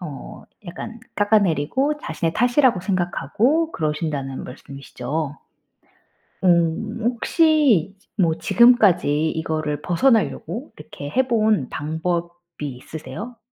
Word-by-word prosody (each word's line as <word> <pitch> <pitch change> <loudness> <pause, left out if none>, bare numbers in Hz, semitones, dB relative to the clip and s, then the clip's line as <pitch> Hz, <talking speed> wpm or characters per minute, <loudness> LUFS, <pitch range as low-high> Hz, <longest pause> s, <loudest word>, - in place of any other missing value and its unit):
어 150 -6 -8 0.2
약간 225 +6 -8 0.2
깎아내리고 205 - +2
자신의 160 - -3
탓이라고 245 -3 +3
생각하고 200 - 0
그러신다는 150 -4 -3
말씀이시죠? 140 +2 -6 1.1
음 175 +6 +2
혹시 250 - +3 0.2
뭐 165 -4 +2
지금까지 180 -11 +4
이거를 155 -2 -2
벗어나려고 230 - 0
이렇게 175 -10 -8
해본 220 - +2
방법이 170 +1 -4
있으세요? 205 - -8
175 Hz, 255 characters per minute, -22 LUFS, 155-230 Hz, 1.1 s, 지금까지